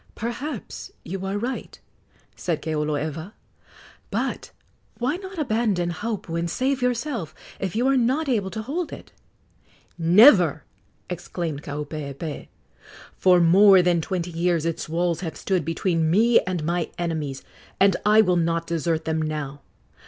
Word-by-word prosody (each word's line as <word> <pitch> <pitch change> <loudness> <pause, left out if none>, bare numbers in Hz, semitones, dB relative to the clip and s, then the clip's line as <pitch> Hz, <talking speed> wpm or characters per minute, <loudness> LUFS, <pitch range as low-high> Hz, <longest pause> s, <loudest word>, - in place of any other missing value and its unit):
"Perhaps 240 +2 -5 0.2
you 190 +3 -5
are 195 +1 -2
right," 245 +5 -5 0.6
said 165 -3 -2
Keoloewa; 155 +3 -2 0.8
"but - - -3 0.5
why 255 +7 -1
not 380 0 -9
abandon 215 - 0
Haupu 175 -2 -4
and 170 0 -2
save 265 +7 0
yourself, 245 - -2 0.2
if 195 -1 -3
you 240 +3 +1
are 270 - +3
not 260 +6 +1
able 215 -7 0
to 220 +2 -5
hold 315 +8 -3
it?" - - -10 0.9
"Never!" 175 - +6 0.4
exclaimed 170 -4 -4
Kaupeepee. 150 0 -6 0.7
"For 180 -1 +5
more 185 +2 +7
than 175 -2 +2
twenty 175 +1 -3
years 170 -1 0
its 165 -2 -3
walls 170 0 0
have 160 -4 -5
stood 185 -4 0
between 165 0 0
me 225 +7 +5
and 180 -4 -2
my 170 +1 -1
enemies, 155 -6 -3 0.4
and 195 -1 +5
I 215 +1 +6
will 180 -4 +2
not 165 0 0
desert 165 -1 -1
them 160 0 0
now. 150 -2 -4
175 Hz, 140 wpm, -24 LUFS, 160-220 Hz, 0.9 s, more